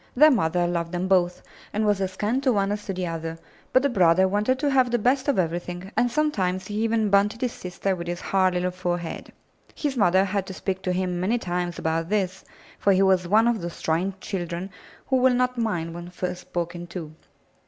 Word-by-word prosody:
Their 305 +4 +7
mother 175 - +2
loved 170 0 -2
them 180 +1 -1
both 180 -2 +2 0.3
and 215 +1 0
was 205 -2 +2
as 190 -1 -2
kind 220 +7 0
to 270 -2 +3
one 200 -3 +1
as 205 0 -4
to 195 - -2
the 185 0 -2
other, 165 -1 -4 0.3
but 255 - +4
the 280 - +3
brother 185 -4 +4
wanted 210 +7 +1
to 285 +2 0
have 260 -2 +4
the 240 - +2
best 260 +5 +1
of 285 - +2
everything, 175 +2 -2
and 245 - +2
sometimes 190 -11 0
he 205 - -7
even 220 -2 +1
bunted 205 +3 +3
his 250 -2 0
sister 185 +1 -3
with 170 -1 -6
his 175 0 -3
hard 185 -2 +1
little 180 0 0
forehead. 175 -2 -4 0.4
His 290 -3 -2
mother 190 -4 +4
had 195 -1 -2
to 190 - -7
speak 190 0 -3
to 185 - -1
him 180 -1 -1
many 205 +7 +1
times 175 -4 -3
about 165 +1 -1
this, 190 -3 -1 0.4
for 200 - +4
he 190 +1 +4
was 185 -2 +3
one 220 +5 +4
of 235 -4 +1
those 170 0 -6
trying 175 +4 0
children 180 -1 -4 0.3
who 265 - +2
will 255 0 +4
not 250 0 +1
mind 175 -8 -1
when 175 +1 -8
first 180 0 -4
spoken 175 0 -4
to. 170 -3 -7
190 Hz, 215 wpm, -25 LUFS, 175-220 Hz, 0.4 s, Their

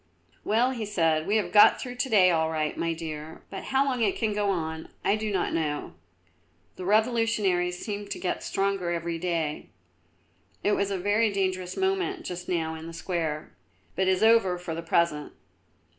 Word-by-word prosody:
"Well," 235 +5 +2
he 235 -4 -4
said, 165 -6 +1
"we 205 - +2
have 185 -5 -1
got 205 +2 +7
through 250 -1 -6
to 260 +2 -1
day 185 -5 +6
all 160 -1 +1
right, 155 -1 -1
my 165 - -1
dear; 160 -1 -6
but - - -6
how 270 +1 +2
long 255 -3 -1
it 205 -3 +2
can 220 -2 0
go 205 -1 0
on, 160 -3 -3 0.2
I 205 - +4
do 215 0 -3
not 190 -3 0
know; 150 -3 -2 0.8
the 185 - -7
revolutionaries 210 -5 +2
seem 205 +1 -5
to - - -4
get 180 - -2
stronger 195 -2 -1
every 170 0 -2
day. 165 -4 -2 0.9
It 205 - +2
was 200 -1 +1
a 195 - -1
very 205 +4 +2
dangerous 185 -2 -2
moment 380 -1 -1
just 180 0 -6
now 165 -3 -1
in 160 0 -8
the 165 - -8
square; 160 - -3 0.4
but 190 +1 +1
is 190 +2 +2
over 220 -5 +5
for 175 -2 -5
the 165 - -4
present." 165 -3 0
185 Hz, 185 wpm, -27 LUFS, 165-210 Hz, 0.9 s, got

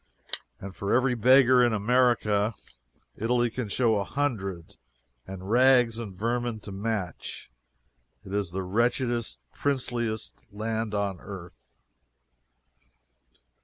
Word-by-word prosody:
And 95 0 -8
for 100 - -3
every 125 +1 +3
beggar 125 +1 +6
in 120 -2 +3
America, 110 -2 +2 0.6
Italy 120 +1 +1
can 115 -3 -4
show 115 0 +2
a 100 - 0
hundred 100 - -3 0.5
and 95 0 -8
rags 125 -2 +5
and 110 -4 -5
vermin 120 +1 -1
to 105 - -9
match. 95 - -4 0.7
It 95 - -8
is 100 -3 0
the 95 +2 -3
wretchedest, 115 - 0
princeliest 120 -5 -2
land 110 +1 -2
on 100 -3 -1
earth. 95 -4 -10
110 Hz, 110 wpm, -27 LUFS, 100-120 Hz, 0.7 s, beggar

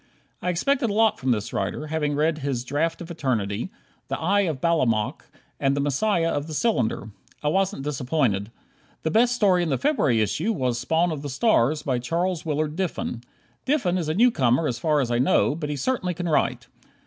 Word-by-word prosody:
I 180 - -1
expected 245 - +1
a - - -1
lot 220 0 +3
from 130 - -2
this 110 -2 0
writer, 150 - -2
having 150 -1 -1
read 155 +1 +1
his 135 -4 -2
"Draft 160 +6 -1
of 170 0 -7
Eternity," 120 - -2 0.4
"The - - -3
Eye 195 +2 +2
of 145 -5 -4
Balamok" 125 -10 0 0.3
and 135 +1 +1
"The - - +1
Messiah 165 +5 +1
of 145 +1 -2
the 155 - -5
Cylinder." 125 - 0 0.3
I 150 - +2
wasn't 190 -4 0
disappointed. 130 -7 0 0.5
The 160 - 0
best 240 +2 +3
story 190 -6 +3
in 170 - -1
the 135 - +1
February 270 - +2
issue 160 - 0
was 125 - -1
"Spawn 160 +7 +1
of 150 -3 -4
the 145 - -5
Stars," 150 - +2
by 130 -3 0
Charles 170 +6 -1
Willard 155 -1 -1
Diffin. 175 -9 -3 0.4
Diffin 260 -11 +1
is 160 -3 -3
a 155 - 0
newcomer 155 - +3
as 120 -3 -3
far 150 +1 +2
as 120 -3 -2
I 120 - +1
know, 135 +2 +3
but 150 -1 -4
he 150 - -2
certainly 180 - -1
can 175 +1 -3
write. 155 - +1
155 Hz, 195 wpm, -24 LUFS, 130-180 Hz, 0.5 s, lot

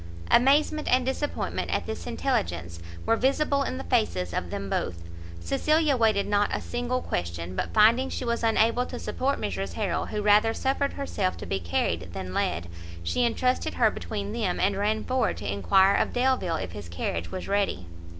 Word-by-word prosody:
Amazement 295 +4 +4
and 255 0 +3
disappointment 265 +3 -2
at - - -1
this - - -6
intelligence 85 - -2 0.3
were 225 - +3
visible 280 +3 +1
in 260 -1 -2
the 265 - -5
faces 215 - 0
of 90 - -2
them 100 - -4
both; 85 -2 -2 0.4
Cecilia 305 - +2
waited 220 -4 +2
not 205 0 +2
a - - -1
single 245 +1 -2
question, 85 +1 -3
but - - -2
finding 230 +5 +5
she - - -4
was 235 0 -1
unable 230 +2 +3
to 245 - -6
support 275 +3 -1
Mrs 95 -2 -3
Harrel, - - -1
who 210 -1 -3
rather 210 +2 +4
suffered 275 +1 0
herself 200 -9 -2
to - - -7
be 95 - -2
carried 85 0 -2
than 90 -1 -5
led, 85 -1 -1 0.4
she 245 - 0
entrusted 250 +2 0
her - - +4
between 205 -2 -5
them, 215 -6 -1
and 200 - +2
ran 215 +2 0
forward 260 0 0
to 100 -1 -3
enquire 190 - +4
of - - +1
Delvile 245 -9 +1
if 90 - -4
his 95 -2 -8
carriage 85 0 -3
was 185 - -5
ready. 200 - 0
210 Hz, 180 wpm, -27 LUFS, -, 0.4 s, finding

